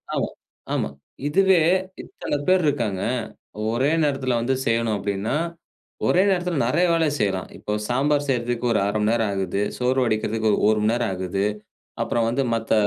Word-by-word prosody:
ஆமா, - - 0 0.4
ஆமா. - - 0 0.4
இதுவே 190 +2 +4 0.4
இத்தன 145 - -4
பேர் 185 -1 +4
இருக்காங்க. 115 -10 0 0.7
ஒரே 130 +6 +1
நேரத்தில 135 -4 0
வந்து 130 +3 +1
செய்யணும் 115 -1 +1
அப்டின்னா, 100 +5 -2 0.7
ஒரே 180 - +4
நேரத்தில 180 -2 0
நெறைய 170 +9 +2
வேல 165 -1 +2
செய்யலாம். 95 -3 -1
இப்போ 105 - -4 0.2
சாம்பார் 145 +3 +1
செய்றதுக்கு 120 -1 -1
ஒரு 110 - +2
1/2 100 - 0
மணி 105 +1 +2
நேரம் 115 -3 +1
ஆகுது, 95 0 -1 0.2
சோறு 125 +1 +1
வடிக்கிறதுக்கு 110 -1 0
ஒரு - - +2
1 110 0 +3
மணி 105 - +3
நேரம் 120 -3 0
ஆகுது, 95 +2 -2 0.6
அப்புறம் 115 -1 0
வந்து 135 +4 0
மத்த 115 -1 0
120 Hz, 160 wpm, -23 LUFS, 105-145 Hz, 0.7 s, இதுவே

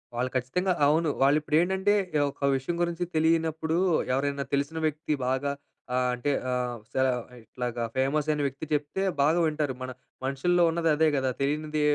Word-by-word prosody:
వాళ్ళు 125 +2 0
ఖచ్చితంగా 180 +10 0
అవును. 160 +2 +3
వాళ్ళిప్పుడేంటంటే, 165 +8 +3 0.4
ఒక 140 0 -2
విషయం 135 +6 -3
గురించి 170 0 -1
తెలియనప్పుడు 160 0 +1 0.4
ఎవరైనా 140 +1 0
తెలిసిన 140 +3 -2
వ్యక్తి 155 0 -2
బాగా 130 +2 0 0.4
ఆహ్, 125 0 +2
అంటే 125 +4 -1 0.2
ఆహ్, 125 -1 -1 0.2
సర 130 0 +2 0.3
ఇట్లాగా 120 +1 -4
ఫేమస్ 140 +3 +1
అయిన 150 -1 +1
వ్యక్తి 140 +3 -6
చెప్తే 150 +4 -1 0.2
బాగా 155 +5 +3
వింటారు. 150 -3 -1
మన 130 0 -4 0.3
మనుషుల్లో 175 +7 +2
ఉన్నది 165 0 0
అదే 160 +1 +3
కదా! 130 -1 +1
తెలియంది 150 +2 -1
150 Hz, 145 wpm, -27 LUFS, 130-160 Hz, 0.4 s, అవును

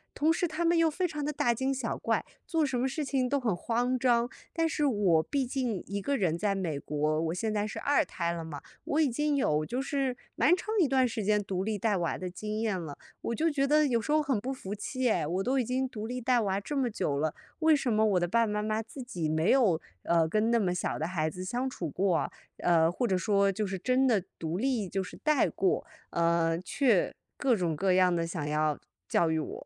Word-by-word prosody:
同 310 +2 +3
时 345 +1 +1
他 325 +2 -3
们 340 0 +3
又 330 -1 +4
非 360 +4 0
常 300 -3 -4
地 300 - -2
大 240 -3 +1
惊 265 +3 0
小 255 -3 -3
怪， - - 0 0.2
做 325 -3 +1
什 265 -4 0
么 260 - +1
事 295 +3 -3
情 265 -2 0
都 280 +2 +1
很 220 -8 0
慌 245 +6 0
张。 240 -1 +2 0.2
但 330 -1 +1
是 300 -2 0
我 195 - +3
毕 275 - -1
竟 245 -6 -2
一 200 +2 -3
个 280 +8 -1
人 170 -5 +1
在 205 +1 0
美 165 -7 -2
国， 150 +2 -1
我 165 +1 -1
现 215 +4 -2
在 210 0 0
是 210 - -5
2 285 0 +2
胎 170 -1 -2
了 170 -1 -4
嘛， 145 -3 -7 0.2
我 310 +2 +1
已 290 - +3
经 295 +4 0
有 155 - +1
就 250 +7 -2
是 270 -3 -1 0.2
蛮 345 +6 +4
长 375 - -9
一 320 - +4
段 260 -1 +3
时 220 -2 -3
间 210 0 +2
独 190 -1 -2
立 210 -1 -2
带 210 -2 +1
娃 170 -2 -1
的 185 -1 -5
经 215 +4 -4
验 215 -5 0
了。 150 -4 -6 0.3
我 235 - -2
就 325 +6 +1
觉 275 -2 +1
得 300 0 +4
有 235 -3 +2
时 260 - -3
候 305 0 +4
很 270 -7 0
不 260 +5 -3
服 205 -6 -6
气 255 +4 -1
哎， 175 -7 +1
我 180 +5 -1
都 265 +2 +1
已 255 - +2
经 255 +1 -1
独 215 -3 -6
立 250 +2 -4
带 245 0 +3
娃 195 -2 0
这 285 +7 -4
么 250 -3 +1
久 145 -9 -1
了， 155 +2 0 0.3
为 315 -1 +5
什 275 -4 -1
么 220 0 +3
我 195 -4 +3
的 175 - 0
爸 230 +5 +3
爸 210 - -3
妈 210 0 -1
妈 215 +1 -1
自 260 +4 -10
己 175 -10 -3
没 160 +4 +1
有， 210 -12 +4 0.2
呃， 165 -1 +3
跟 215 +4 +1
那 235 - +4
么 185 -4 +1
小 180 - -2
的 160 - -1
孩 160 -4 -1
子 180 +3 -5
相 245 +7 -2
处 175 - -4
过， 185 +1 0 0.3
呃， 165 -2 +3
或 235 +7 -1
者 190 -2 +1
说 200 +2 +2
就 210 +2 -2
是 190 -1 -4
真 255 +4 +2
的 215 -8 +3
独 165 +3 -3
立 240 -6 0
就 195 +1 -2
是 180 - -8
带 305 -3 +3
过， 190 - 0 0.3
呃， 170 0 +2
却 225 0 +1 0.2
各 255 -4 +2
种 175 -5 -1
各 185 +3 +2
样 180 -1 +4
地 165 0 -1
想 160 -3 -4
要 150 0 0 0.3
教 165 -1 +2
育 160 - +1
我。 - - -6
215 Hz, 270 characters per minute, -29 LUFS, 180-265 Hz, 0.3 s, 为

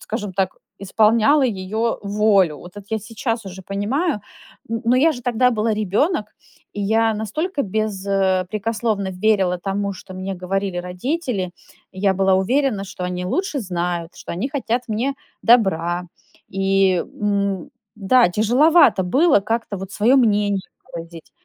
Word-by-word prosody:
скажем 210 -3 -5
так, 190 -1 -1 0.2
исполняла 220 +8 +3
её 220 +1 -1
волю. 200 -5 +2
Вот 175 +5 -12
это 205 - -9
я 220 - 0
сейчас 225 +1 -4
уже 190 0 -8
понимаю, 210 - -1 0.5
н 230 0 -3
но 240 +2 +3
я 315 +5 +4
же 245 - -9
тогда 250 +1 +2
была 220 0 0
ребенок, 210 - 0 0.4
и 205 - -5
я 220 +2 +2
настолько 280 - -2
бес 210 -1 -2
э,...прекословно 200 +2 0
верила 185 -2 +1
тому, 200 +2 -2
что 185 0 -11
мне 190 +1 -4
говорили 190 0 -2
родители, 190 - -3 0.4
и 190 - -9
я 195 -1 +3
была 190 0 +3
уверена, 225 +3 +1
что 185 -2 -7
они 180 0 -3
лучше 345 - -1
знают, 175 -3 -3
что - - -7
они 185 +10 -2
хотят 250 -4 -1
мне 235 +6 -1 0.3
добра. 180 -7 +3 0.4
И, 195 -1 +2
м, 200 +4 -2 0.2
да, 220 +2 +4
тяжеловато 240 - +4
было 275 - +4
как-то 225 0 -2
вот 195 +1 -8
свое 230 +7 +3
мнение 205 -5 +2 0.3
выразить. 165 -1 -9
205 Hz, 145 wpm, -21 LUFS, 190-230 Hz, 0.5 s, я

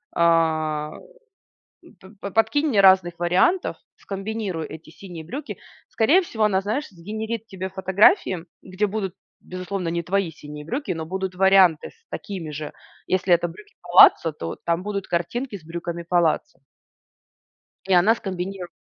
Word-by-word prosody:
"А, 155 -2 +2 1.1
п 190 - -15
п 200 - -5
подкинь 225 +9 +2
мне 215 -9 +3
разных 185 -3 +5
вариантов, 185 - +2 0.2
скомбинируй 195 -5 -4
эти 160 0 -11
синие 175 -2 -10
брюки" 275 - -6 0.3
Скорее 300 +12 +4
всего 225 -11 -3
она, 190 -2 +2
знаешь, 230 +10 -2
сгенерит 220 +4 -6
тебе 190 -1 -6
фотографии, 190 - +3 0.2
где 190 +3 -1
будут, 195 -2 -4 0.3
безусловно, 185 0 -4
не 170 0 -2
твои 185 -1 0
синие 150 -1 -10
брюки, 250 - -3
но 160 -1 -5
будут 190 +1 -4
варианты 190 -4 +5
с 460 0 -30
такими 180 -7 -6
же. 150 0 -6 0.3
Если 185 -1 +2
это 175 0 +2
брюки 415 - -15
палаццо, 165 - +6
то 85 - -6
там 170 +2 0
будут 200 -2 -4
картинки 205 +8 -2
с 160 - -19
брюками 170 +1 -5
палаццо. 175 -3 +1 1.3
И 190 - +1
она 190 +6 +5
скомбиниру 190 -2 -5
185 Hz, 145 wpm, -23 LUFS, 170-210 Hz, 1.3 s, палаццо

